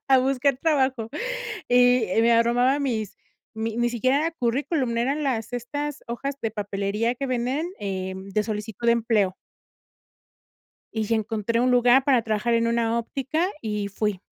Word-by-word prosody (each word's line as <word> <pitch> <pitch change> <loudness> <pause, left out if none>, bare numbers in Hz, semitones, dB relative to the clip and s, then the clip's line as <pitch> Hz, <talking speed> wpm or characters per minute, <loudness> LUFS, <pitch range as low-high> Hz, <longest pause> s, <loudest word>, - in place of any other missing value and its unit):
a 265 -1 +6
buscar 265 +1 +1
trabajo. 265 -7 +1 0.6
Y 245 -1 +5
me 235 +1 +4
armaba 245 +4 +3
mis 225 -7 -2 0.4
mi 220 0 -3
ni 240 - +2
siquiera 255 +3 +1
era 325 +3 0
currículum, 255 -1 -1
eran 275 +6 0
las 230 -5 -2
estas 290 +4 -4
hojas 270 +4 -3
de 225 - 0
papelería 205 +2 -1
que 275 +2 -4
venden, 255 +5 -1
eh, 190 -1 -3
de 195 +2 -2
solicitud 215 +1 -5
de 235 - +6
empleo. 220 -5 +1 1.6
Y 220 -1 -2
encontré 220 +1 -1
un 250 +1 +3
lugar 245 +2 +5
para 260 -3 +3
trabajar 220 +1 0
en 230 0 +2
una 230 0 +1
óptica 275 +9 -2
y 210 -2 -2
fui. 200 -1 -2
235 Hz, 150 wpm, -24 LUFS, 220-260 Hz, 1.6 s, a